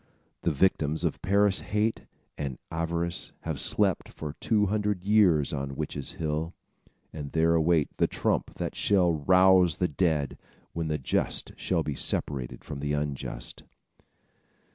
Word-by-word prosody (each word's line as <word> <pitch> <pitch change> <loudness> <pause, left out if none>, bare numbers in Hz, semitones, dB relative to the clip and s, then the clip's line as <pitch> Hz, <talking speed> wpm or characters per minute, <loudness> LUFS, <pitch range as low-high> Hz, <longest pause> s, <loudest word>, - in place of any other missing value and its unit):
The - - +1
victims 80 -1 +1
of - - -1
Parris' 100 0 +3
hate 105 +2 -1 0.3
and 70 -4 -4
avarice 85 +1 -2
have - - -4
slept - - +1
for 75 -2 -6
two 105 -2 +2
hundred 105 -2 -1
years 95 -9 +4
on 70 -1 -3
Witches' 70 0 -4
Hill, 80 +1 -3 0.6
and 75 -2 -6
there 80 +1 +3
await 80 -2 +2
the - - +3
trump - - -1
that - - -3
shall 90 -4 +3
rouse 90 +2 +5
the 90 - +1
dead, 75 -3 0 0.3
when 85 -1 -2
the 75 -1 0
just 65 - -1
shall 85 -3 0
be 75 - -2
separated 65 -2 -3
from 70 - -7
the 75 +1 -2
unjust. 70 -4 -4
80 Hz, 140 wpm, -28 LUFS, 75-95 Hz, 0.6 s, rouse